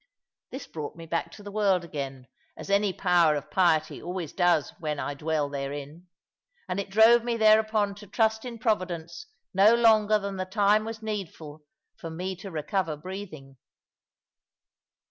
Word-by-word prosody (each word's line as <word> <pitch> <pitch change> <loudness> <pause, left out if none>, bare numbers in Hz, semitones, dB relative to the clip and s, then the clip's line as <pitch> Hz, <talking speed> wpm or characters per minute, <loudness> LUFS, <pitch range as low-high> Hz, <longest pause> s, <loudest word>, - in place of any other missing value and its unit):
This 265 - -7
brought 150 -3 -7
me 165 0 -10
back 165 +1 -2
to 205 - -12
the 205 - -8
world 200 -4 +2
again, 135 -5 -6 0.3
as - - -7
any 200 0 +3
power 175 -4 +3
of 145 - -6
piety 160 -4 +2
always 175 -3 -5
does 175 -5 +2
when 150 -3 -3
I 145 - -3
dwell 150 0 -1
therein, 145 +4 -6 0.6
and 180 +1 -2
it 200 - -4
drove 225 +4 +6
me 235 -1 -1
thereupon 215 -1 +3
to 205 0 -12
trust 220 +2 +1
in 245 -2 -7
Providence 185 - -2 0.3
no 200 +4 +6
longer 215 -2 +4
than 200 -1 -5
the 185 - -2
time 205 +2 +2
was 225 0 -7
needful 165 -8 -6 0.4
for 165 - -6
me 180 +4 -4
to 195 +2 -8
recover 165 0 -2
breathing. 155 -6 -9
185 Hz, 160 wpm, -27 LUFS, 160-215 Hz, 0.6 s, drove